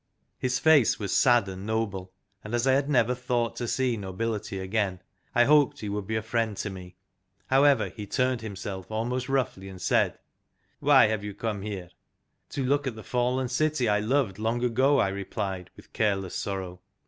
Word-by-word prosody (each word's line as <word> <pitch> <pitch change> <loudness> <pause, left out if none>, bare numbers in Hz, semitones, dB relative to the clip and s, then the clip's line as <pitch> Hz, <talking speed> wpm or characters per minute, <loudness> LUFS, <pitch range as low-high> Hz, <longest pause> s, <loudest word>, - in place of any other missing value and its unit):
His 125 -1 0
face 150 -5 +5
was 100 -3 -3
sad 120 -5 +4
and 95 0 -7
noble, 100 -4 -2 0.3
and 110 +2 -3
as 120 +1 +1
I 130 - +4
had 140 +2 +1
never 125 -3 +3
thought 125 -2 -1
to 120 - -3
see 130 0 +1
nobility 105 +1 -3
again, 95 0 -1 0.4
I 120 - +6
hoped 145 +1 +4
he 105 - -4
would 100 -1 -3
be 110 - -2
a 110 - -1
friend 115 -2 -1
to 105 - -3
me. 90 -1 -10 0.6
However, 135 -6 +4
he 105 +2 -8
turned 125 +1 0
himself 100 -3 -6
almost 120 +4 -2
roughly, 120 -8 -1
and 95 -1 -10
said: - - +1 0.3
" - - -44
Why 140 -3 +6
have 110 -1 -1
you 105 -1 -6
come 105 -2 -3
here? 95 -4 -6 0.3
" - - -50
"To 135 - -1
look 140 +2 +1
at 125 - -3
the 110 - -9
fallen 125 +1 0
city 135 0 +1
I 105 -1 +3
loved 110 -3 0
long 115 +2 -1
ago," 130 +4 +3
I 100 - +3
replied, 95 -1 -4
with - - -17
careless 95 -4 0
sorrow. 95 -3 -4
110 Hz, 195 wpm, -27 LUFS, 100-125 Hz, 0.6 s, I